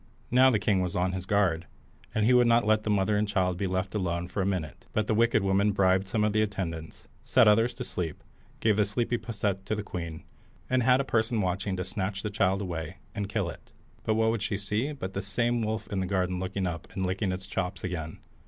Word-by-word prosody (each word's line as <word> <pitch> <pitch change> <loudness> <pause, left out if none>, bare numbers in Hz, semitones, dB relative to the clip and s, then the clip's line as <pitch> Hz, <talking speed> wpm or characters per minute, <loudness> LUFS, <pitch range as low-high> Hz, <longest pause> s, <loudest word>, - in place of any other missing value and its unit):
Now 130 +2 +7
the 120 - +3
king 100 -2 +1
was 90 -2 -2
on 90 +1 +1
his 95 0 -5
guard, 90 -5 +2 0.5
and 110 -1 +2
he 125 - +5
would 125 -1 +6
not 115 -1 +4
let 110 0 +3
the 110 - -4
mother 105 0 +2
and 105 +1 +1
child 95 -3 +1
be 95 +2 -1
left 95 +1 -2
alone 90 -4 -1
for 100 - -2
a 95 - +1
minute; 90 -6 -3
but 110 - +1
the 110 - +1
wicked 115 -1 +3
woman 100 +2 +2
bribed 95 -1 +3
some 110 +1 0
of 105 -1 +2
the 110 - +3
attendants, 85 -6 -4 0.2
set 125 -4 +5
others 115 +4 +3
asleep, 90 -10 -4 0.4
gave 110 -2 +3
the 105 - +4
sleepy 120 +3 -1
posset 100 -4 -2
to 110 - 0
the 105 - -3
queen, 85 -5 -6 0.5
and 130 0 +3
had 125 +2 +4
a - - -4
person 110 -1 +1
watching 95 0 -1
to 90 - -1
snatch 95 -1 -3
the 105 - -2
child 100 -1 +1
away, 85 -1 -5 0.2
and 100 -1 -3
kill 105 -4 -1
it. 85 - -9 0.3
But 110 - +1
what 110 0 +2
should 105 - 0
she 100 - -2
see 105 +8 -1
but 95 -10 -6
the 100 - -2
same 115 +4 0
wolf 110 0 -2
in 100 - -1
the 95 - -1
garden 90 -2 0
looking 95 +1 -2
up 85 -1 -5
and 95 - -1
licking 95 +2 -1
his 95 +1 -3
chops 95 -1 -3
again? 80 -4 -4
100 Hz, 235 wpm, -28 LUFS, 95-110 Hz, 0.5 s, Now